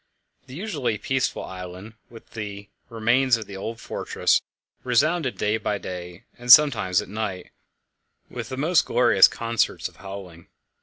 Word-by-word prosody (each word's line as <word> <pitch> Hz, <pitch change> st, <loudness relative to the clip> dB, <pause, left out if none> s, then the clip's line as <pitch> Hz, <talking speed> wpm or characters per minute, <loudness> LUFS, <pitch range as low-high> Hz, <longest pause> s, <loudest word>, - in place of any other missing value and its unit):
The 130 Hz, -, -10 dB
usually 155 Hz, -, -2 dB
peaceful 130 Hz, +4 st, -1 dB
island, 90 Hz, +3 st, -9 dB, 0.2 s
with 115 Hz, -1 st, -15 dB
the 100 Hz, -2 st, -7 dB, 0.2 s
remains 120 Hz, +2 st, +2 dB
of 110 Hz, -, -7 dB
the 100 Hz, -, -10 dB
old 115 Hz, +4 st, -6 dB
fortress, -, -, 0 dB, 0.4 s
resounded 140 Hz, +3 st, +1 dB
day 105 Hz, +1 st, 0 dB
by 105 Hz, -2 st, -2 dB
day, 90 Hz, -2 st, -8 dB, 0.2 s
and 120 Hz, 0 st, +2 dB
sometimes 120 Hz, -11 st, +6 dB
at -, -, -13 dB
night, 100 Hz, -2 st, -5 dB, 0.8 s
with -, -, -7 dB
the 130 Hz, -, -5 dB
most 155 Hz, +3 st, +3 dB
glorious 115 Hz, -5 st, +5 dB
concerts 115 Hz, -1 st, -1 dB
of -, -, -19 dB
howling. 95 Hz, -4 st, -10 dB
110 Hz, 145 wpm, -24 LUFS, 95-130 Hz, 0.8 s, sometimes